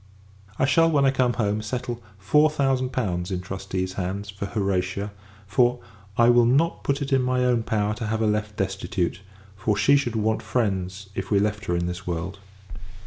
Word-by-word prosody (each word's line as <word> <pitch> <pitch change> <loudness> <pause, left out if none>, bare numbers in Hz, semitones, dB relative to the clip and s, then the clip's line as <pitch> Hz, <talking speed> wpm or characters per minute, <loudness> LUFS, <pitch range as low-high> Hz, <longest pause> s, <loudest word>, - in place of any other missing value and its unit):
I 130 - +3
shall, 165 +4 +4
when 145 -3 +3
I 135 - +5
come 125 -2 +2
home, 105 -2 0
settle 120 +2 -4 0.2
four 150 +11 +4
thousand 135 -3 +1
pounds 90 -9 -2
in 95 -2 -2
trustees 95 0 -4
hands, 100 +2 -4
for 100 0 -5
Horatia; 100 -1 -1 0.3
for, 120 +5 +2 0.4
I 115 - +6
will 120 -1 +6
not 150 +7 +2
put 140 +1 0
it 135 0 -2
in 135 - +4
my 125 0 +1
own 120 -2 +3
power 105 -2 0
to 110 +1 -4
have 110 +1 -1
her - - +2
left 105 0 -1
destitute: 95 -2 -2 0.3
for 100 +1 0
she 140 - +4
would 120 -2 -3
want 110 0 +1
friends, 95 -4 -2
if 95 0 -4
we 100 - +3
left 105 +1 -1
her 85 - 0
in 85 0 0
this 90 +1 -5
world. 90 +3 -3
105 Hz, 195 wpm, -25 LUFS, 95-125 Hz, 0.4 s, I